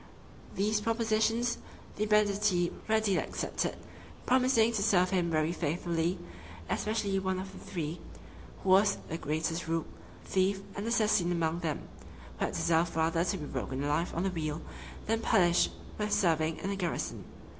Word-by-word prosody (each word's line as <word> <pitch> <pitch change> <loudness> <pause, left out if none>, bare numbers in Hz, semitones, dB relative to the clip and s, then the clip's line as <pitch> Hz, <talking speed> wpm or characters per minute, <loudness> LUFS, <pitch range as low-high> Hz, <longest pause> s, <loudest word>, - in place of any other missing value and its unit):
These 210 +2 +1
propositions 230 +1 +1 0.4
the 215 +1 -1
banditti 205 -4 +3 0.2
readily 220 -3 +2
accepted, - - -2 0.5
promising 250 -3 +4
to 220 -3 -1
serve 185 -3 +3
him 180 -3 +1
very 155 0 +1
faithfully, 170 +1 -1 0.5
especially 210 -3 0
one 190 0 -1
of 190 +1 -6
the - - -11
three, 165 -1 -5 0.6
who 195 - -1
was 200 +2 +5
the 165 - -3
greatest 160 +3 -2
rogue, 165 0 0 0.4
thief, 190 +1 +1
and 200 +3 -3
assassin 215 -6 +2
among 165 -1 0
them, 160 -4 -3 0.5
who - - +2
had - - -4
deserved 165 0 +2
rather 165 +1 +2
to 190 +2 -1
be 150 - -6
broken 130 0 -3
alive 150 +4 0
on 170 - 0
the 195 - 0
wheel, 155 -2 -3 0.4
than 225 +1 +1
punished 175 -5 +4 0.3
with 210 0 -1
serving 160 -4 +2
in 195 - -3
a - - -1
garrison. 180 -4 -3
185 Hz, 155 wpm, -31 LUFS, 165-210 Hz, 0.6 s, was